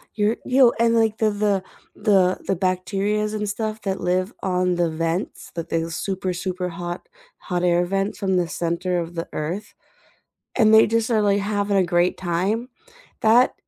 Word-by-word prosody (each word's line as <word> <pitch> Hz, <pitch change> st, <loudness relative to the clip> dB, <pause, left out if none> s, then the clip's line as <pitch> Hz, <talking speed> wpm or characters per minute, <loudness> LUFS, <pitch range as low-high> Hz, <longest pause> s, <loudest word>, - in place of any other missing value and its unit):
You're 210 Hz, +1 st, +1 dB
you 250 Hz, -2 st, +5 dB
and 230 Hz, 0 st, +3 dB
like 225 Hz, -1 st, +2 dB
the 220 Hz, -, +2 dB
the 205 Hz, -2 st, 0 dB, 0.3 s
the 190 Hz, -4 st, +3 dB
the 195 Hz, -, +1 dB
bacterias 195 Hz, +4 st, -1 dB
and 210 Hz, -1 st, -2 dB
stuff 215 Hz, +1 st, -3 dB
that 195 Hz, -1 st, -3 dB
live 185 Hz, +4 st, 0 dB
on 180 Hz, -1 st, +1 dB
the 175 Hz, -1 st, +1 dB
vents 165 Hz, +4 st, -3 dB
that 165 Hz, 0 st, -5 dB
those 165 Hz, 0 st, -2 dB
super, 190 Hz, 0 st, -2 dB
super 180 Hz, 0 st, -3 dB
hot 175 Hz, +1 st, -6 dB, 0.3 s
hot 180 Hz, -1 st, -3 dB
air 175 Hz, 0 st, +3 dB
vents 195 Hz, +2 st, -1 dB
from 195 Hz, -2 st, 0 dB
the 175 Hz, -2 st, +1 dB
center 175 Hz, +2 st, -1 dB
of 170 Hz, 0 st, -5 dB
the 165 Hz, -, -4 dB
Earth, 175 Hz, +8 st, -4 dB, 0.8 s
and 220 Hz, -1 st, +4 dB
they 220 Hz, -, +7 dB
just 230 Hz, +1 st, 0 dB
are 220 Hz, -2 st, +3 dB
like 200 Hz, -1 st, +2 dB
having 205 Hz, 0 st, 0 dB
a 190 Hz, -, +4 dB
great 175 Hz, +1 st, +1 dB
time. 190 Hz, +7 st, -1 dB, 0.5 s
That 235 Hz, +3 st, +5 dB
190 Hz, 175 wpm, -23 LUFS, 175-210 Hz, 0.8 s, they